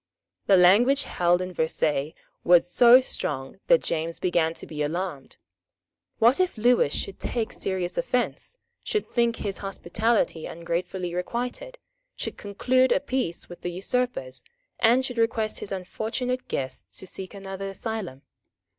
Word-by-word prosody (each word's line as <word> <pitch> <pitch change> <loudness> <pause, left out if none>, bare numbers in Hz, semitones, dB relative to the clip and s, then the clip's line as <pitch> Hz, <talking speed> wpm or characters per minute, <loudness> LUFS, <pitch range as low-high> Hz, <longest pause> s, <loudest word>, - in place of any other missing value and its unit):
The 195 - +6
language 235 +10 +5
held 175 +1 +1
at 180 -1 -7
Versailles 155 -2 0 0.3
was 175 0 +5
so 245 +5 +8
strong 135 - -4
that - - +5
James 165 +1 -2
began 165 -2 +1
to - - -9
be 150 -1 -6
alarmed. 155 -2 -3 0.8
What 235 +7 +5
if 370 -8 +1
Lewis 240 -9 +4
should 195 - -3
take 235 0 -2
serious 185 -2 -2
offence, - - -1 0.2
should 425 - -2
think 235 -1 +1
his 200 -3 -4
hospitality 195 -2 -1
ungratefully 175 +2 -3
requited, 245 - -4 0.4
should - - -4
conclude 255 +5 +1
a - - +4
peace 255 -11 -2
with 175 - -11
the 175 - -3
usurpers, 185 - -2 0.4
and 240 +3 +4
should 245 -3 -4
request 225 -1 0
his 200 - -7
unfortunate 225 +7 -3
guests 130 -1 -4
to - - -5
seek 190 +2 -7
another 195 0 -6
asylum? 195 - -5
195 Hz, 140 wpm, -26 LUFS, 175-245 Hz, 0.8 s, so